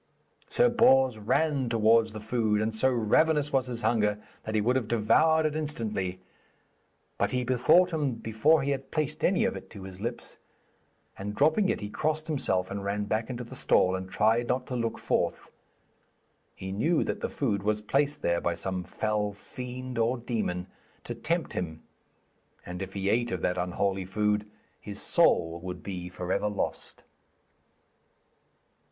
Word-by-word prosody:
Sir - - +4
Bors 135 - +4
ran 135 +4 +1
towards 115 0 +4
the 110 - -7
food, 110 -1 0
and 110 +1 -1
so 110 +4 +3
ravenous 145 +6 +2
was 130 -1 +2
his 120 -1 -5
hunger 105 -3 +2 0.3
that 110 - -3
he - - +3
would 120 +5 +2
have 130 -5 0
devoured 155 +9 +3
it 155 -1 0
instantly. 110 -12 -3 1.0
But - - +1
he 125 0 +1
bethought 130 +9 +4
him 145 -5 0
before 115 +7 +2
he 140 - 0
had 135 -1 -4
placed 155 -1 -2
any 195 +5 +3
of 235 - -1
it - - -9
to 100 -3 -10
his 95 0 -9
lips, 120 +2 -5 0.8
and 105 +1 -5
dropping 155 - +3
it - - -1
he 105 - -5
crossed 155 +4 -1
himself 95 - 0
and 100 0 -4
ran 100 +1 -1
back 110 +3 -2
into 125 -1 -4
the 120 - -11
stall 90 - +3
and 95 0 -5
tried 110 +5 +2
not 125 0 0
to 125 - -5
look 115 -2 -2
forth. - - -1 1.0
He 95 0 -6
knew 150 - +1
that - - -3
the - - -2
food 110 -8 -1
was 105 +1 0
placed 140 +7 0
there 85 0 +1
by 85 - 0
some 95 -1 -2
fell 105 +1 -1
fiend 125 +3 -6
or 115 +3 +2
demon 110 -7 -2 0.4
to 120 - -5
tempt 160 +9 -2
him, 80 -3 -4 0.8
and 90 +1 -6
if 95 0 -6
he 100 -1 -3
ate 120 +3 +1
of 95 - -3
that 90 0 0
unholy 95 +2 -1
food, 105 +2 0 0.3
his - - -6
soul 85 +1 +3
would 90 0 -7
be 90 -3 -5
for 90 0 -5
ever 105 +2 +1
lost. 105 - -4
115 Hz, 170 wpm, -28 LUFS, 100-130 Hz, 1.0 s, Sir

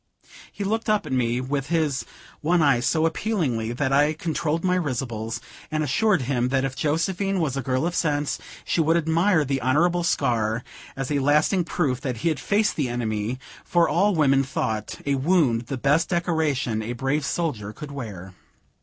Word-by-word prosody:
He 205 - -5
looked 220 +3 -1
up 215 -1 +2
at - - -7
me 120 -1 +1
with 135 +2 -2
his 150 -7 0 0.3
one 170 +2 +2
eye 140 -5 +4
so 155 +6 +1
appealingly, 160 - -1
that 130 +2 -1
I 145 +2 +4
controlled 160 0 -2
my 180 -1 +2
risibles, 120 -8 -2 0.3
and 155 0 -1
assured 180 +4 +2
him 125 -1 0
that 135 0 +1
if 135 -1 -4
Josephine 185 +7 0
was 150 -6 0
a 135 - -1
girl 130 +2 0
of 175 - -1
sense, 145 -4 0 0.3
she 170 - +1
would 165 +2 +3
admire 165 +1 +2
the 135 -1 -1
honorable 170 +8 +2
scar, 120 -7 0 0.3
as 135 +1 -4
a 145 - +2
lasting 150 +6 +3
proof 140 -8 -1
that 130 -4 -3
he - - +5
had 155 -5 -1
faced 210 +8 +1
the 140 -5 0
enemy, 115 0 -2 0.3
for 170 -1 +3
all 200 +3 +2
women 135 -3 +4
thought 110 -4 -3
a 140 - +1
wound 135 -5 +2
the 135 - -3
best 145 +5 +2
decoration 155 -10 0
a 115 +3 -4
brave 135 +4 -1
soldier 130 -11 -2
could 145 +7 -9
wear. 100 -9 -7
145 Hz, 180 wpm, -24 LUFS, 125-165 Hz, 0.3 s, he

